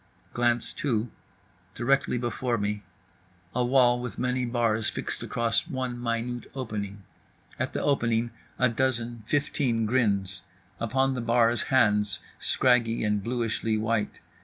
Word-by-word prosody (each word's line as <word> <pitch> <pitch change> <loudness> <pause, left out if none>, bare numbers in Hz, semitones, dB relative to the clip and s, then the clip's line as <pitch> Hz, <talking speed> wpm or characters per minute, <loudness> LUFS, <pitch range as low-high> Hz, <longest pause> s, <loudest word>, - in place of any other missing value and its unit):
Glance 120 -1 +1
two: 115 -5 -1 0.6
directly 135 0 +1
before 120 0 -1
me. 105 0 -2 0.7
A 125 - +1
wall 120 -1 +4
with 125 -1 -6
many 125 0 0
bars 115 -3 +1
fixed - - -4
across 115 -1 +1
one 130 -2 -3
minute 120 +1 -2
opening. 105 -6 -4 0.6
At - - -2
the - - -2
opening 120 -4 +1 0.3
a 125 - +4
dozen, 120 -1 -1
fifteen, 130 -5 +1
grins. 100 -5 +1 0.4
Upon 130 +4 +1
the 125 - -3
bars 115 -1 +3
hands, 105 -7 +4 0.2
scraggy 120 -3 +2
and 105 -2 +1
bluishly 115 -2 -1
white. 110 0 -1
120 Hz, 125 wpm, -27 LUFS, 110-125 Hz, 0.7 s, wall